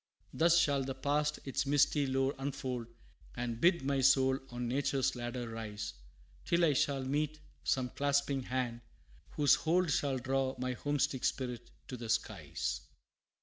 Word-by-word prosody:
Thus 170 +1 +4
shall 140 -5 +3
the 135 0 -4
past 145 +2 0
its 135 0 -1
misty 145 0 +3
lore 135 +1 +1
unfold, 130 -4 -3 0.5
And 120 -1 -3
bid 170 -3 +4
my 135 -1 +1
soul 130 0 +4
on 120 0 -4
nature's 135 +1 0
ladder 120 0 -4
rise, 110 -2 -5 0.5
Till 170 0 +3
I 150 - +3
shall 135 0 +1
meet 150 +3 -1 0.2
some 130 -2 +1
clasping 140 -1 +1
hand, 125 -2 -2 0.5
whose 145 -2 +5
hold 170 +1 +2
Shall 140 -2 +1
draw 130 +1 0
my 130 0 -2
homesick 145 0 -1
spirit 125 -3 -2 0.2
to 125 - -6
the 115 -1 -7
skies. 115 0 -2
135 Hz, 145 wpm, -33 LUFS, 125-145 Hz, 0.5 s, whose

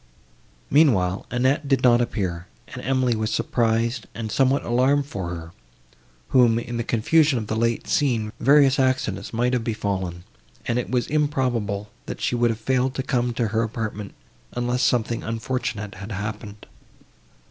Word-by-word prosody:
Meanwhile, 105 - +3
Annette 130 +4 +1
did 135 -2 +2
not 120 -1 +5
appear, 90 -7 -3 0.2
and - - -7
Emily 130 -2 +1
was 110 0 -2
surprised, 115 0 0
and 110 -2 -4
somewhat 135 +3 +2
alarmed 130 +4 +2
for 95 -10 -5
her, 85 -1 -7 0.8
whom, 120 -3 +4
in 120 0 -4
the 120 - -1
confusion 140 +6 +3
of 110 - -3
the 110 - -3
late 115 +1 0
scene, 115 -7 0
various 140 +1 +5
accidents 130 -7 0
might 120 +2 0
have 125 -2 0
befallen, 95 -6 -3 0.4
and 120 +1 0
it 125 - -4
was 125 -1 +1
improbable, 125 -9 -1 0.2
that - - -5
she - - -1
would 120 -1 +2
have 115 -1 -2
failed 130 +3 0
to 130 - -2
come 125 -2 0
to 115 -2 0
her 110 +2 +1
apartment, 110 -3 -4 0.4
unless 120 +1 -1
something 120 -2 +1
unfortunate 115 -3 -3
had 100 +4 -9
happened. 105 0 -6
115 Hz, 160 wpm, -23 LUFS, 105-130 Hz, 0.8 s, not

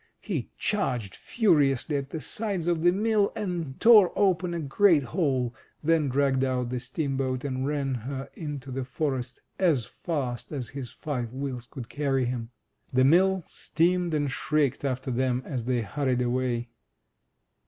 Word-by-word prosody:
He - - -3
charged 125 - -1
furiously 150 - +2
at 140 -1 -2
the 160 - -4
sides 200 0 -2
of 170 -2 +1
the 175 +1 +5
mill, 210 +1 +2
and 175 -10 -3
tore 215 -6 +7
open 185 -3 +2
a - - -2
great 160 +1 +4
hole, 130 -5 0 0.3
then 160 -2 +3
dragged 135 0 +2
out 125 -2 0
the 125 - -1
steamboat, 130 0 -2
and 130 -1 -2
ran 140 -2 -1
her 130 +3 -5
into 145 -4 -6
the 130 +1 -2
forest 130 -2 -3 0.2
as 160 - +3
fast 135 -8 -4
as 130 -6 -4
his 135 -3 -6
five 125 -7 -4
wheels 130 -3 -4
could 120 -2 -8
carry 135 -2 0
him. 120 -2 -3 0.4
The 130 0 +4
mill 185 +5 +4
screamed 175 +1 0
and 145 -2 0
shrieked 150 -2 0
after 130 -1 -2
them 125 0 0
as 125 -5 -4
they 125 -2 0
hurried 130 +1 0
away. 120 -1 -1
135 Hz, 155 wpm, -27 LUFS, 125-165 Hz, 0.4 s, tore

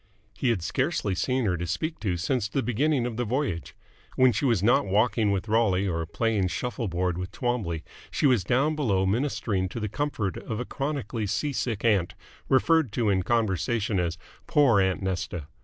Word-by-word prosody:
He 130 - 0
had 105 -8 0
scarcely 95 +3 0
seen 125 +7 0
her 90 -3 +1
to 85 +1 -4
speak 155 - -3
to 95 -5 -1
since 105 +5 0
the 135 +4 -1
beginning 130 +2 +1
of 120 -2 -4
the 125 - 0
voyage. 120 - -2 0.4
When 130 -1 +5
she 110 +5 -1
was 115 -7 +2
not 120 +2 +4
walking 105 +2 +2
with 100 +1 -1
Rolly 105 -3 +2
or 80 -3 -2
playing 105 +1 0
shuffle 120 +4 -3
board 90 0 -1
with 90 0 -5
Twombley, 110 -11 -2 0.3
she - - -1
was 125 -8 +4
down 135 - +2
below 100 -11 +1
ministering 100 -4 0
to 115 - -5
the 105 - -2
comfort 110 -5 -2
of 110 - -5
a 125 - -3
chronically 135 -7 -3
sea 145 +8 -1
sick 115 -4 -2
aunt, 100 -6 +2 0.3
referred 155 -1 +3
to 110 -3 +1
in 95 -1 +2
conversation 110 -1 0
as 85 -1 -1 0.3
"poor 145 - +4
aunt 95 0 0
Nesta". 90 -4 -3
110 Hz, 190 wpm, -26 LUFS, 95-125 Hz, 0.4 s, When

